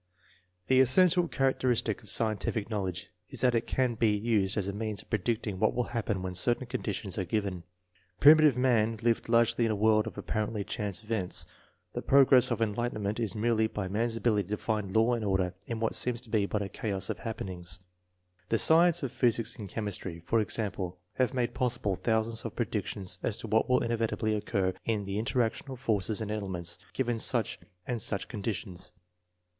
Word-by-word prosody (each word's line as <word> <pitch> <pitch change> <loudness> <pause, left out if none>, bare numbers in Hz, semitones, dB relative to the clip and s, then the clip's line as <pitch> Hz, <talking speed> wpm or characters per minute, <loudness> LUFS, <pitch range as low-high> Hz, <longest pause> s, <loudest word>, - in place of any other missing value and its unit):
The 130 +4 +4
essential 175 +7 +5
characteristic 130 -6 0
of 105 - -11
scientific 110 0 -1
knowledge 95 -4 -3 0.2
is - - -5
that 125 -2 +3
it 115 -1 0
can 130 -2 +1
be 115 0 +2
used 105 -3 +1
as 100 -2 0
a 100 - -3
means 105 0 -4
of - - -33
predicting 110 -2 -1
what 110 - +2
will 125 - +1
happen 105 -5 -2
when 95 -1 -4
certain 120 +8 +1
conditions 105 -4 -3
are - - 0
given. 95 -1 -2 0.6
Primitive 150 -2 +7
man 115 -3 +2
lived 115 -1 +1
largely 115 0 +3
in 115 - +2
a 110 - 0
world 110 +1 +3
of - - -8
apparently 105 -1 -2
chance 105 -1 -4
events. 105 -5 0 0.5
The - - -3
progress 135 -2 +6
of 115 - 0
enlightenment 110 -1 -2
is 115 -1 -1
measured 110 0 +1
by 105 -3 -2
man's 115 +3 -1
ability 105 -5 0
to 105 - -1
find 105 -3 -2
law 115 +2 +4
and 115 -2 -2
order 95 -3 0
in 115 -2 -3
what 115 0 0
seems 125 -1 +1
to 120 -3 -16
be 105 -3 +2
but 105 0 -1
a 100 - -5
chaos 100 0 -2
of 105 - -6
happenings. 90 -6 -4 0.7
The 115 - +2
sciences 170 +4 +5
of 130 - -2
physics 115 -1 0
and 100 -3 -7
chemistry, 95 -6 -5
for 115 - +2
example, 100 -4 -2 0.2
have 130 0 0
made 120 -2 0
possible 115 -6 -1
thousands 110 +2 0
of - - -6
predic - - -2
tions 90 -2 -5
as 110 - -1
to - - -6
what 110 +3 +2
will 125 - +3
inevitably 115 -1 -1
occur 100 -3 -1
in 105 -3 -1
the 100 +1 -3
interaction 115 +3 -1
of 130 -2 -7
forces 110 -3 0
and 105 -1 -3
elements, 95 -5 -4
given 120 -3 -1
such 115 -2 +2 0.3
and 120 -3 -3
such 100 -1 0
conditions. 100 -4 -5
110 Hz, 190 wpm, -29 LUFS, 100-120 Hz, 0.7 s, Primitive